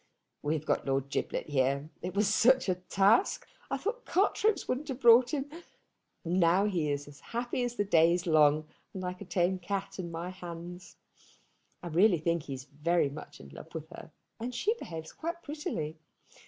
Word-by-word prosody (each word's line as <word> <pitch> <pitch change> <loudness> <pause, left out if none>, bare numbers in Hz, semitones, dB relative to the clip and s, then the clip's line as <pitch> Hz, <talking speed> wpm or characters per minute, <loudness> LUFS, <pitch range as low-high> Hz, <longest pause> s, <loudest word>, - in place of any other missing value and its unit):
"We 150 +2 0
have 155 0 -4
got - - 0
Lord 135 0 0
Giblet - - -2
here. 140 +1 0
It 180 +1 -5
was 205 0 +3
such 250 +4 +4
a 185 - +3
task! 195 - +2 0.2
I - - -1
thought 475 +5 -3
cart 400 +3 +1
ropes 430 -2 +2
wouldn't 270 +4 -2
have 265 -3 -4
brought 240 0 +7
him? 280 -2 -1 0.8
Now 175 +2 +3
he 175 -7 0
is 145 0 -3
as 145 -1 -13
happy 240 +2 -3
as 245 -1 -2
the 205 - 0
day 165 -4 +5
is 175 0 0
long, 155 -2 +4 0.3
and 185 - -4
like 180 +1 -5
a - - -6
tame 180 +1 +1
cat 195 +2 -4
in 175 -2 -4
my 170 +2 -5
hands. 175 0 -9 0.9
I 175 - -4
really 180 +3 +4
think 170 +1 0
he 140 -2 -6
is 130 - -8
very 150 +3 0
much 150 +2 -10
in 70 - -12
love 70 - -12
with - - -6
her, - - -10 0.3
and 240 +2 -4
she 420 - +1
behaves 160 -1 -7
quite 340 +1 -5
prettily. 160 - -4
180 Hz, 195 wpm, -30 LUFS, 155-230 Hz, 0.9 s, brought